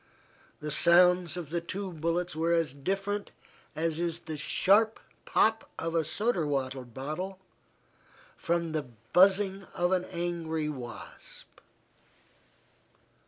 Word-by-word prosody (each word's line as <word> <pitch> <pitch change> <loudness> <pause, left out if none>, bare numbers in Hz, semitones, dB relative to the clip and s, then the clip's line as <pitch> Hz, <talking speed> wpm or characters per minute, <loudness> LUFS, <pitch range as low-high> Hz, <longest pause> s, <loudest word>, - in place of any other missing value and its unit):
The 150 0 -4
sounds 175 +1 +5
of 165 -4 -6
the 170 0 -1
two 185 +2 -5
bullets 170 +2 -1
were 165 +2 +1
as 165 -5 +1
different 195 +8 -2 0.5
as 160 0 -1
is 170 -1 -2
the 160 - -6
sharp 205 +8 +3 0.3
pop 220 0 +2
of 165 0 -3
a 165 -1 +2
soda 205 +3 0
water 135 -2 -1
bottle 150 +10 -5 1.0
from 170 -1 -1
the 155 -4 -2 0.3
buzzing 195 +1 +4
of 175 +1 +1
an 185 -1 +2
angry 170 -3 -2
wasp. 125 -5 -9
170 Hz, 120 wpm, -29 LUFS, 155-185 Hz, 1.0 s, sounds